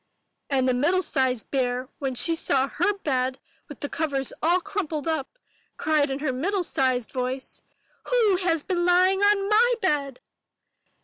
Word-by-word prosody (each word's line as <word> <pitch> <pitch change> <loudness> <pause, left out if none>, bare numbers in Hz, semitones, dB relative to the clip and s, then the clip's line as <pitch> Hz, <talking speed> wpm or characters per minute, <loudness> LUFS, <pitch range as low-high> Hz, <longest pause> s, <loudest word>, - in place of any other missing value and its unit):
And 265 -2 +1
the 255 - +3
middle 335 +9 +2
sized 260 -7 -1
bear, 255 -1 -1
when 270 -2 -3
she 330 +7 +2
saw 275 -4 +1
her 360 +8 0
bed 265 -9 -2 0.3
with 290 - -11
the 285 - -2
covers 280 -4 -2
all 345 +3 +3
crumpled 335 -5 -4
up, 315 - -3 0.4
cried 305 -2 +1
in 270 - -2
her 280 -2 -2
middle 365 +9 -1
sized 255 -6 0
voice, 255 0 -4 0.4
''Who 440 -7 +2
has 330 -4 0
been 355 -2 -1
lying 365 +2 +4
on 405 -1 +3
my 460 +4 +4
bed?" 285 - -1
300 Hz, 160 wpm, -25 LUFS, 265-365 Hz, 0.4 s, lying